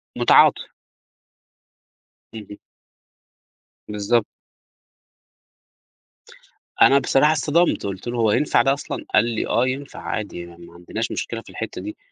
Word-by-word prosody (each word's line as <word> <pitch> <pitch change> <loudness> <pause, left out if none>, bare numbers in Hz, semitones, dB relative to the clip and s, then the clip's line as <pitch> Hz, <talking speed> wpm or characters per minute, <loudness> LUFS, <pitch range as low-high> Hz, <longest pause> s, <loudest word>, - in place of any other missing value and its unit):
متعاطف. - - +4 1.7
اهم. 105 -2 -10 1.3
بالضبط. 105 +2 0 2.5
أنا 140 - +7
بصراحة 145 +2 +3
اتصدمت، 165 +3 +1
قُلت 95 +2 -6
له: 120 0 -3
"هو 110 -2 +2
ينفع 150 - +2
ده 135 - +2
أصلًا؟" 140 - -6
قال - - +4
لي: 115 -2 -3
"آه 125 +2 +1
ينفع 135 +2 -5
عادي 105 -5 -5
يعني 85 0 -12
ما - - -16
عندناش 100 +7 -5
مشكلة 115 -1 -4
في - - -17
الحتّة 115 - -6
دي" 315 +1 -8
115 Hz, 120 wpm, -21 LUFS, 105-135 Hz, 2.5 s, أنا